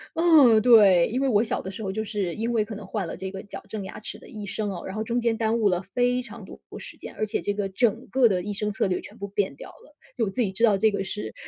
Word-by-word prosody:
嗯， 300 -10 +6
对， 205 -7 +6
因 250 +4 -2
为 275 - +2
我 210 -4 +4
小 230 - -2
的 190 - -6
时 200 - -8
候 200 - -3
就 220 +3 -3
是 200 -5 -3
因 230 +2 -2
为 220 -3 +1
可 220 0 -7
能 205 0 -9
换 195 -2 -3
了 - - -5
这 190 0 -6
个 190 0 -7
矫 205 - -9
正 215 - -5
牙 - - -8
齿 - - -7
的 - - -15
医 210 -2 -8
生 205 +1 -3
哦， 190 - -6
然 190 - -6
后 215 - -2
中 240 +2 -1
间 230 -1 +1
耽 225 0 +1
误 215 -3 +3
了 180 -1 0
非 245 0 +2
常 230 -3 -10
多 - - -12
的 - - -9
时 - - -11
间， - - -10
而 215 - 0
且 210 - -2
这 205 - -1
个 200 -1 -2
整 230 +4 0
个 260 -2 +4
的 185 -4 0
医 205 - -4
生 210 +1 -2
策 195 - 0
略 185 - -1
全 - - -12
部 200 - -5
变 195 -7 -1
掉 - - -10
了， 295 - -19 0.2
就 230 - +1
我 - - -2
自 220 +6 -2
己 205 -5 0
知 230 +5 +2
道 210 -3 +3
这 220 +2 +3
个 200 -1 -2
是 210 +2 -5
215 Hz, 340 characters per minute, -25 LUFS, 195-230 Hz, 0.2 s, 嗯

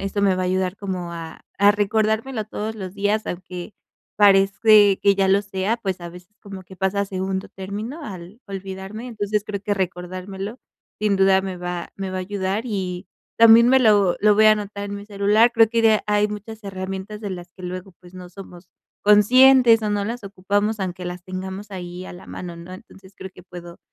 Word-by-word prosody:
eso 195 +1 -2
me 195 -2 +3
va 185 - -2
a - - -1
ayudar 185 +1 -1
como 185 -4 -5
a 165 -1 -9 0.2
a 200 +1 +6
recordármelo 220 +3 0
todos 220 +1 -5
los 190 -3 -7
días, 205 +2 0
aunque 180 +2 -7 0.4
parece 200 0 +5
que 200 -1 +4
ya 195 -1 +1
lo 195 +1 +3
sea. 200 +2 -2
Pues 190 -6 -4
a 175 - -7
veces 180 +3 -14
como 195 -2 -9
que 190 +1 -14
pasa 190 +2 0
a - - +1
segundo 190 0 -4
término 210 - -7
al 190 +1 -10
olvidarme, 195 +3 -7
entonces 210 -2 -2
creo 200 -2 -5
que 205 0 -1
recordármelo 190 +4 -5 0.4
sin 210 -1 +1
duda 190 0 +4
me 190 -1 -5
va 175 0 -5
me 195 -1 -4
va 185 - -4
a - - -2
ayudar, 195 +2 -2
y 190 -5 -4 0.3
también 230 +1 +8
me 265 +1 +6
lo 205 -6 +4
lo 210 0 +5
voy 215 - +4
a 215 - +8
anotar 205 -1 -4
en - - -4
mi 200 - -10
celular. 210 +3 +3
Creo 225 -1 +5
que 230 0 0
de 220 -1 +4
hay 210 0 +2
muchas 215 +1 -8
herramientas 195 +2 -6
de 205 -2 -5
las 175 -1 -7
que 185 - -13
luego 185 +1 -6
pues 180 0 -17
no 180 -1 -10
somos 180 -1 -13 0.4
conscientes 235 +3 +6
o 210 - -1
no 205 -1 -1
las 235 +2 -5
ocupamos 205 +3 -1
aunque 185 -2 -4
las 180 0 -6
tengamos 190 +2 -7
ahí 180 0 -7
a - - -9
la 180 - -12
mano, 175 -2 -8
¿no? 170 +2 -11
Entonces, 190 +1 -14
creo 190 - -8
que 180 - -14
puedo 175 -1 -11
195 Hz, 205 wpm, -22 LUFS, 185-210 Hz, 0.4 s, también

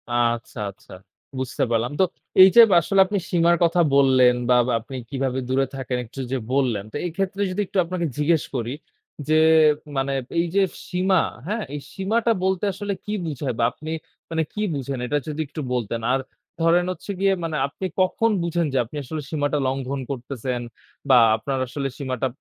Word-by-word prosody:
আচ্ছা, 120 0 0
আচ্ছা 100 - -21 0.5
বুঝতে 130 -2 -2
পারলাম। 115 +2 +1
তো - - +6 0.4
এইযে 190 +5 +9
ব - - -1
আসলে 195 +4 +1
আপনি 205 +2 -2
সীমার 170 0 +4
কথা 170 +1 +3
বললেন 130 -3 +5
বা 125 - +6 0.2
আপনি 115 +4 -10
কিভাবে 130 -2 -1
দূরে 135 +1 +2
থাকেন 130 -2 -3
একটু 120 +4 -11
যে 135 - +1 0.2
বললেন। 125 -7 +1
তো - - -11
এক্ষেত্রে 195 +3 -3
যদি 195 +3 -1
একটু 200 - -5
আপনাকে 175 0 -2
জিজ্ঞেস 155 +1 +2
করি 120 0 -2 0.5
যে, 155 - +2 0.6
মানে 135 +1 0 0.3
এইযে 175 +4 +1 0.3
সীমা, 185 0 +2 0.3
হ্যাঁ? 215 +2 -2
এই - - -3
সীমাটা 220 +4 +1
বলতে 190 0 0
আসলে 200 +1 -3
কি 210 - -4
বুঝায় 140 -4 -3
বা - - +2
আপনি 155 - -9 0.4
মানে 160 -1 0
কি 210 - -3
বুঝেন 135 -2 -4
এটা 145 +4 0
যদি 155 +1 -3
একটু 155 - -6
বলতেন। 115 -2 -2
আর 135 - +2 0.4
ধরেন 170 +2 +4
হচ্ছে 185 - -6
গিয়ে 195 0 +3
মানে 160 -2 -2
আপনি 165 +7 -7 0.2
কখন 185 +5 +2
বুঝেন 170 0 0
যে - - +1
আপনি 120 +6 -12
আসলে 155 +4 -5
সীমাটা 145 -1 0
লঙ্ঘন 135 +1 -2
করতেছেন 125 -1 -4 0.5
বা 130 - +7 0.2
আপনার 130 +4 -3
আসলে 135 +2 -3
সীমাটা 130 -2 -2
145 Hz, 175 wpm, -23 LUFS, 130-180 Hz, 0.6 s, এইযে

